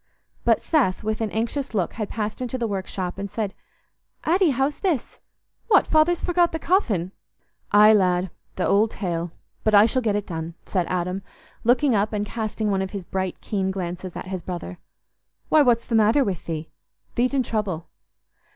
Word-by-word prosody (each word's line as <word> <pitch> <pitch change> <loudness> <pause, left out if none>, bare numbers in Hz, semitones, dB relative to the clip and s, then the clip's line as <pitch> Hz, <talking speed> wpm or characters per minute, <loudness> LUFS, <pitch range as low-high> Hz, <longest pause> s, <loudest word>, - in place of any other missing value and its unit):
But - - +3
Seth, 250 - +1
with 215 +1 -2
an 220 - 0
anxious 235 +4 -2
look, 185 -4 0
had 215 -3 -4
passed 215 +1 -3
into 255 0 -2
the 240 - -1
workshop 190 -2 -3
and 200 0 -4
said, 205 -1 -3 0.7
"Addy, 355 +2 +3
how's 270 +2 0
this? 350 - -1 0.5
What! 420 -4 +5
Father's 320 +2 +3
forgot 350 -1 +2
the 320 - -2
coffin?" 220 - +1 0.6
"Aye, 210 +1 +8
lad, 180 -3 +2 0.3
th' - - -2
old 210 +4 +3
tale; 175 -5 -3 0.3
but 215 -1 +3
I 205 +1 +8
shall 255 +3 +1
get 215 -4 +1
it 205 -1 -1
done," 165 -1 -5
said 180 -3 -1
Adam, 180 +1 -1 0.4
looking 255 +3 +3
up 210 +1 +1
and 205 0 -1
casting 215 -1 -2
one 190 -1 +1
of 190 - -2
his 195 -3 -6
bright 190 -1 -3
keen 195 -3 -1
glances 180 -1 -4
at - - -5
his 185 -2 -3
brother. 180 0 -6 0.7
"Why, 310 - +6
what's 240 -4 +3
the - - -5
matter 225 +5 +5
with 195 -8 -3
thee? 160 -1 -4 0.4
Thee't 250 +3 +1
in 265 - +3
trouble." 195 -8 -2
210 Hz, 180 wpm, -24 LUFS, 185-245 Hz, 0.7 s, Aye